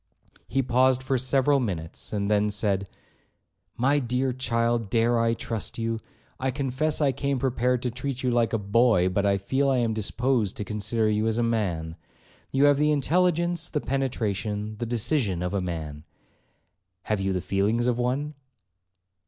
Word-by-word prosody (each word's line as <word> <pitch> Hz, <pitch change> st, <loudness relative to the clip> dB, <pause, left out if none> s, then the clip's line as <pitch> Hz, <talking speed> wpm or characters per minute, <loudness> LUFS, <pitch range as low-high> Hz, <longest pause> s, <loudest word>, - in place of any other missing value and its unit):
He 135 Hz, +3 st, 0 dB
paused 130 Hz, +1 st, +2 dB
for 130 Hz, -1 st, 0 dB
several 135 Hz, +2 st, +3 dB
minutes, 90 Hz, -10 st, -4 dB
and 100 Hz, -1 st, -1 dB
then 105 Hz, 0 st, +2 dB
said, 100 Hz, -2 st, 0 dB, 0.9 s
'My 140 Hz, +4 st, +3 dB
dear 125 Hz, +1 st, 0 dB
child, 115 Hz, -3 st, 0 dB
dare 115 Hz, +2 st, +2 dB
I 115 Hz, 0 st, +2 dB
trust 115 Hz, -1 st, -4 dB
you? 115 Hz, -1 st, -2 dB, 0.4 s
I 130 Hz, 0 st, 0 dB
confess 140 Hz, +4 st, -1 dB
I 140 Hz, -2 st, +3 dB
came 140 Hz, +1 st, -1 dB
prepared 125 Hz, -1 st, 0 dB
to 125 Hz, -, -1 dB
treat 130 Hz, +1 st, -4 dB
you 125 Hz, -, +1 dB
like 120 Hz, -1 st, +2 dB
a 115 Hz, -, +1 dB
boy, 105 Hz, -2 st, +3 dB
but 100 Hz, +2 st, 0 dB
I 100 Hz, 0 st, +3 dB
feel 135 Hz, +8 st, 0 dB
I 135 Hz, -, +2 dB
am 115 Hz, -2 st, +1 dB
disposed 110 Hz, 0 st, 0 dB
to -, -, -3 dB
consider 110 Hz, +2 st, -1 dB
you 105 Hz, +1 st, +1 dB
as 110 Hz, 0 st, 0 dB
a 120 Hz, -, +1 dB
man. 90 Hz, -8 st, -1 dB, 0.5 s
You 135 Hz, +1 st, +2 dB
have 145 Hz, -1 st, +5 dB
the 150 Hz, 0 st, +3 dB
intelligence, 170 Hz, +3 st, +1 dB
the 150 Hz, -, -1 dB
penetration, 110 Hz, -6 st, -2 dB
the 120 Hz, -, -3 dB
decision 115 Hz, -, 0 dB
of 90 Hz, -, -2 dB
a 100 Hz, -, 0 dB
man. 80 Hz, -4 st, -5 dB, 1.0 s
Have 105 Hz, -2 st, -1 dB
you 95 Hz, 0 st, 0 dB
the 95 Hz, -, 0 dB
feelings 105 Hz, +6 st, 0 dB
of 125 Hz, -1 st, +1 dB
one?' 135 Hz, +5 st, -1 dB
120 Hz, 170 wpm, -26 LUFS, 105-130 Hz, 1.0 s, have